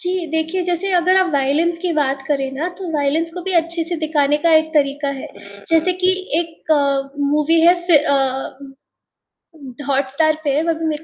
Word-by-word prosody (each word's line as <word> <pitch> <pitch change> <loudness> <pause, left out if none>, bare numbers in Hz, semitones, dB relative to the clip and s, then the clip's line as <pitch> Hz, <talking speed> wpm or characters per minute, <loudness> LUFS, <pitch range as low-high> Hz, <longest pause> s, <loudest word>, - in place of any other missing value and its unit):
जी, 360 -1 -2
देखिए 320 +3 -1
जैसे 360 +2 -2
अगर 360 +1 +3
आप 370 -2 +2
वायलेंस 290 +5 +1
की 360 -2 -1
बात 270 -2 0
करें 275 -2 -1
ना 310 +7 -3
तो 375 - -6
वायलेंस 310 +3 0
को 360 - -5
भी 380 +1 -3
अच्छे 335 0 +1
से 345 - -2
दिखाने 295 -2 +1
का 330 - +4
एक 315 0 +2
तरीका 285 0 +1
है, - - -7 0.4
जैसे 330 +2 +2
कि 370 - +5 0.3
एक 325 -1 -3 0.6
मूवी 305 +2 +2
है 345 +2 +6
फिर 305 -4 +5
अ 270 -1 -2 1.1
हॉट 270 -1 0
स्टार 310 +3 +1
पे 280 -2 0
है, 305 - +2
अभी 325 0 -2
मेरे 305 0 -3
315 Hz, 185 wpm, -18 LUFS, 280-340 Hz, 1.1 s, है